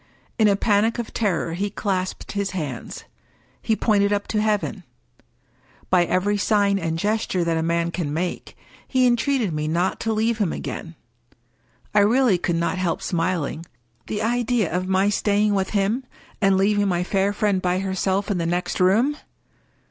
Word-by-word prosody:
In 215 - +5
a 200 - +4
panic 210 +2 +2
of 235 -2 -5
terror 180 -6 -1
he 200 +4 -2
clasped 190 -2 -3
his 200 -2 -2
hands; 140 -8 -5 0.6
he 220 - +1
pointed 205 -2 +2
up 205 0 -1
to 210 - +1
heaven. 210 -1 -1 1.1
By 180 -2 +4
every 205 +4 0
sign 200 -1 +2
and 165 -1 -2
gesture 205 -1 0
that 165 -1 0
a 160 - 0
man 170 +1 0
can 170 -5 -3
make, 175 +4 -4 0.3
he 255 -1 +2
entreated 240 - +1
me 150 0 -2
not 175 +4 0
to 225 - -1
leave 220 +1 0
him 200 -6 +1
again. 165 0 -6 1.0
I 210 - +5
really 220 -1 +4
could 175 -1 -1
not 170 +2 -1
help 180 -2 -1
smiling. 165 -3 -1 0.4
The 210 0 -2
idea 240 -5 0
of 185 +1 -1
my 190 +1 +2
staying 205 0 +1
with 190 -1 0
him, 210 +5 0 0.4
and 195 -1 +4
leaving 205 +1 +2
my 175 -2 0
fair 195 +2 +1
friend 205 -2 0
by 180 0 +1
herself 190 +1 -1
in 190 - 0
the 165 - -1
next 175 +1 -2
room! 225 +11 +3
195 Hz, 170 wpm, -23 LUFS, 180-210 Hz, 1.1 s, In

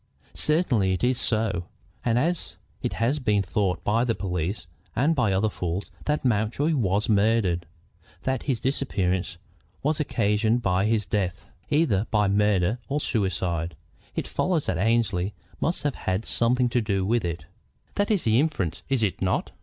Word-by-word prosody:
"Certainly 125 - +2
it 95 - -3
is 125 0 +2
so. 110 -6 0 0.4
And 120 -1 +2
as 165 +6 -1 0.2
it - - -1
has 125 +7 +1
been 105 -6 +2
thought 95 0 -1
by 115 +3 +2
the 115 -3 +1
police, 90 0 -2 0.3
and 150 +6 +3
by 120 -7 +2
other 95 +3 +2
fools, 90 -2 -3
that 150 -2 0
Mountjoy 120 +7 +1
was 105 -5 +1
murdered, 100 -5 +2 0.6
that 130 -1 0
his 125 -4 +1
disappearance 95 -10 0 0.5
was 150 +2 +1
occasioned 110 -3 +1
by 95 +1 +2
his 110 -2 +1
death, 95 -4 -2 0.2
either 145 - +2
by 105 -2 +3
murder 105 +1 +2
or 145 +2 0
suicide, 90 - -1 0.4
it - - -2
follows 175 -5 0
that 85 - -1
Annesley 105 -3 +1 0.2
must 170 - -1
have 145 -2 +1
had 95 +1 -2
something 125 +2 +2
to 120 0 +1
do 100 -3 0
with 115 +2 +1
it. 85 -2 -3 0.5
That 205 0 0
is 205 -5 +2
the 110 +1 +3
inference, 135 - -1
is 135 -4 +2
it 100 - -1
not?" 95 -1 0
110 Hz, 160 wpm, -26 LUFS, 95-125 Hz, 0.6 s, and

